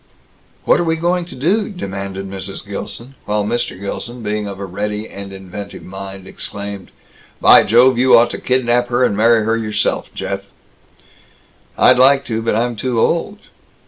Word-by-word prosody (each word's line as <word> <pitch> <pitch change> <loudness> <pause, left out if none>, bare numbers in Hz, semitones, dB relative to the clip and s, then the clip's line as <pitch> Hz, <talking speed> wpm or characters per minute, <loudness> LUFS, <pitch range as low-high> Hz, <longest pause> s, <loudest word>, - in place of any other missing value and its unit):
"What - - +4
are - - +1
we 165 -1 +1
going 175 +2 0
to 170 - -11
do?" 190 - +1
demanded 100 - -5
Mrs. 95 +1 -6
Gilson; 115 +5 -6
while 105 0 0
Mr. 120 -4 -2
Gilson, 120 +4 -6
being 105 0 -2
of 100 -1 -7
a 100 - -4
ready 105 +3 -4
and 100 0 -9
inventive 95 +1 -9
mind, 95 0 -8
exclaimed, 100 -1 -7 0.5
"By - - +8
Jove, 120 +2 +4
you 125 -1 +6
ought 120 +1 +4
to - - -5
kidnap 120 -1 +1
her 120 +1 +1
and 100 - +2
marry 115 +1 +4
her 115 +1 +2
yourself, 105 -2 -1
Jeff!" 100 0 -3 1.4
"I'd 125 0 +5
like 135 +2 +5
to. 115 -1 -2
But 115 -1 0
I'm 120 +1 0
too 120 +1 -1
old." 170 - 0
110 Hz, 170 wpm, -18 LUFS, 100-125 Hz, 1.4 s, By